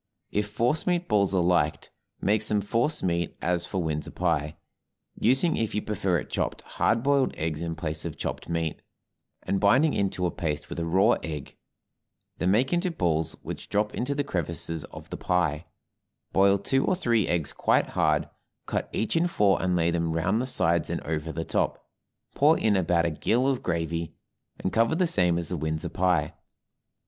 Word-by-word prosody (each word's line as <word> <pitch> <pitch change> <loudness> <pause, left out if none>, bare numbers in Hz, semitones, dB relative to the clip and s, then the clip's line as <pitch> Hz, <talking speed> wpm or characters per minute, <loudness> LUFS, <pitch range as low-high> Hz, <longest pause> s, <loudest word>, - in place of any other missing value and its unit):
If 105 0 0
force 120 - 0
meat 175 -1 +1
balls 100 -3 +2
are 90 - +3
liked, 85 -5 +1 0.3
make 105 +1 +2
some 105 -1 +2
force 115 +9 0
meat 85 -2 -1
as 90 +1 -1
for 95 -3 -2
Windsor 75 -2 -3
pie, 80 -4 -1 0.6
using 135 +8 +2
if 115 -2 -1
you 105 - -1
prefer 95 -4 0
it - - -6
chopped - - -2
hard 115 +1 0
boiled 140 -1 +2
eggs 80 0 -2
in 85 -1 -3
place 80 -2 -4
of 85 -3 -5
chopped - - -5
meat, 80 -2 -2 0.6
and 100 - 0
binding 130 +10 +4
into 95 -2 0
a 85 - 0
paste 75 -3 -3
with - - -5
a 85 - -2
raw 95 +4 +4
egg; 75 -3 -6 0.8
then 90 - +1
make 120 - +2
into 175 +1 +1
balls, 80 - 0
which - - -7
drop 105 +1 0
into 140 +4 -2
the 145 - 0
crevices 85 - -3
of - - -12
the - - -4
pie; 85 -3 0 0.7
boil 100 +1 +5
two 135 +7 +1
or 185 - +2
three 115 - +1
eggs 85 -4 -1
quite - - +2
hard, - - +1 0.4
cut - - -2
each 110 +7 -1
in 165 +2 +3
four 105 - +2
and 90 -1 +1
lay 85 -1 +2
them 85 -1 0
round 90 +8 +1
the 130 - -2
sides 85 -9 +1
and - - -1
over 80 0 -3
the 80 0 -4
top, - - -1 0.5
pour 155 +3 +4
in 105 -2 +2
about 85 -2 +2
a 85 - +1
gill 115 - +1
of 135 -2 0
gravy, 85 -1 -2 0.4
and 95 - -3
cover 115 +7 +3
the 180 +2 +2
same 90 - +2
as 85 - -3
the 90 - -2
Windsor 80 +1 -2
pie. 90 -5 +1
90 Hz, 190 wpm, -27 LUFS, 80-115 Hz, 0.8 s, boil